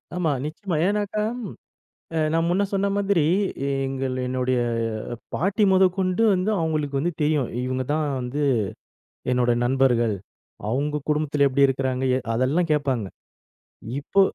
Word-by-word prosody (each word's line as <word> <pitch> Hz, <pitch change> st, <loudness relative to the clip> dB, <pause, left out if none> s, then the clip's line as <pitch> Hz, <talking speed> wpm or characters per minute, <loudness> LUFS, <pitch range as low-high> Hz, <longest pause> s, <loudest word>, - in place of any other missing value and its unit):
ஆமா, 175 Hz, -4 st, +1 dB
நிச்சயமா. 165 Hz, +4 st, -4 dB
ஏனாக்கா, 205 Hz, +1 st, 0 dB, 0.9 s
அ -, -, +1 dB
நான் 165 Hz, +1 st, +2 dB
முன்ன 185 Hz, +4 st, +2 dB
சொன்ன 200 Hz, 0 st, +1 dB
மாதிரி 200 Hz, -4 st, +2 dB, 0.6 s
எங்கள் 135 Hz, -1 st, -2 dB
என்னுடைய 130 Hz, 0 st, 0 dB, 0.8 s
பாட்டி 195 Hz, +5 st, +1 dB
மொதக் 185 Hz, -1 st, +4 dB
கொண்டு 185 Hz, +3 st, +1 dB
வந்து 185 Hz, +3 st, 0 dB
அவங்களுக்கு 155 Hz, -4 st, -1 dB
வந்து 175 Hz, +5 st, 0 dB
தெரியும். 150 Hz, -4 st, +1 dB, 0.2 s
இவங்க 130 Hz, 0 st, -1 dB
தான் 155 Hz, 0 st, +1 dB
வந்து 125 Hz, +4 st, -3 dB, 0.9 s
என்னோட 125 Hz, -1 st, +3 dB
நண்பர்கள். 120 Hz, -3 st, +2 dB, 0.5 s
அவங்க 145 Hz, +6 st, 0 dB
குடும்பத்துல 150 Hz, -1 st, +2 dB
எப்படி 140 Hz, +1 st, +4 dB
இருக்குறாங்க? 130 Hz, -1 st, -1 dB
எ -, -, +1 dB, 0.2 s
அதெல்லாம் 140 Hz, +9 st, +1 dB
கேட்பாங்க. 135 Hz, -7 st, 0 dB, 0.9 s
இப்போ, 195 Hz, +7 st, +2 dB
150 Hz, 125 wpm, -24 LUFS, 130-180 Hz, 0.9 s, மொதக்